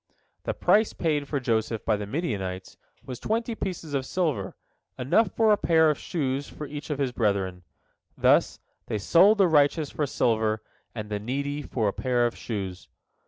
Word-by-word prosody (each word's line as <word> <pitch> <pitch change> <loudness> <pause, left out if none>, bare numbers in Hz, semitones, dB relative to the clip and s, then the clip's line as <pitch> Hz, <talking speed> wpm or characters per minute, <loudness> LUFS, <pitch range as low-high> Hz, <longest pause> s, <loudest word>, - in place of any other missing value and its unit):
" - - -46
The - - -2
price 215 +1 +3
paid 150 -4 -1
for 140 - -1
Joseph 115 -3 -1
by 110 - +3
the 105 -1 -5
Midianites 100 - -3 0.3
was 125 -2 -7
twenty 230 +2 -1
pieces 180 -8 -5
of 135 -2 0
silver, 135 - -2 0.4
enough 185 - +2
for 225 -1 +4
a 210 - +5
pair 160 -4 +4
of 150 - -4
shoes 140 -4 -2
for 150 - -7
each 145 +1 -7
of 150 - -1
his 135 -3 0
brethren. 100 -6 -1 0.6
Thus - - +3 0.3
"they - - -1
sold 180 - +5
the 195 -2 +5
righteous 150 -1 +3
for 150 - -1
silver, 110 -4 +1 0.3
and 105 -2 -6
the 105 - -1
needy 140 +6 -3
for 115 -6 -1
a 100 - 0
pair 125 -2 +1
of 120 - -1
shoes." 95 -5 -5
135 Hz, 180 wpm, -26 LUFS, 110-160 Hz, 0.6 s, a